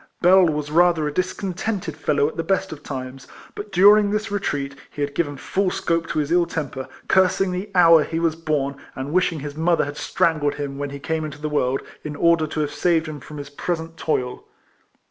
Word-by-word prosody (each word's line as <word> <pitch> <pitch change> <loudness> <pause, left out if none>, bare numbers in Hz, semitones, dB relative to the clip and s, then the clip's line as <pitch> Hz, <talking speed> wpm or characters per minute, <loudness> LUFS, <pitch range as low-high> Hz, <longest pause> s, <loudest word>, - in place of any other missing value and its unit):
Bell 185 +1 +6
was 150 -1 -2
rather 170 -1 +4
a 150 - -4
discontented 185 -1 -2
fellow 145 -1 +1
at 155 - -6
the - - -1
best 195 +3 0
of 150 -2 -8
times; 130 -2 -7 0.3
but 205 0 -8
during 205 +2 +6
this 215 +1 -2
retreat 145 -9 -2 0.2
he 145 - -4
had 140 0 -3
given 145 -3 -1
full 190 +8 0
scope 165 -2 -1
to - - -4
his 150 0 0
ill 175 0 +3
temper, 140 -5 -4 0.2
cursing 190 0 +3
the 185 +3 -4
hour 165 -3 +7
he 165 - -4
w^as 165 -1 +1
born, 140 -3 -1 0.2
and 135 +3 -5
wishing 175 -4 +1
his 145 0 -6
mother 165 +1 +2
had 145 +1 -7
strangled 155 -5 +1
him 140 -1 -5
when 145 0 -3
he 140 - -7
came 160 +3 -2
into 150 -1 -6
the 150 +1 -3
world, 135 -3 0 0.2
in 150 -1 -5
order 170 0 +3
to 155 0 -3
have 145 -1 -2
saved 165 +1 +2
him 155 -1 -6
from 150 +3 -10
his 140 -1 -8
present 165 +2 -4
toil. 125 -6 -2
160 Hz, 210 wpm, -22 LUFS, 145-180 Hz, 0.3 s, hour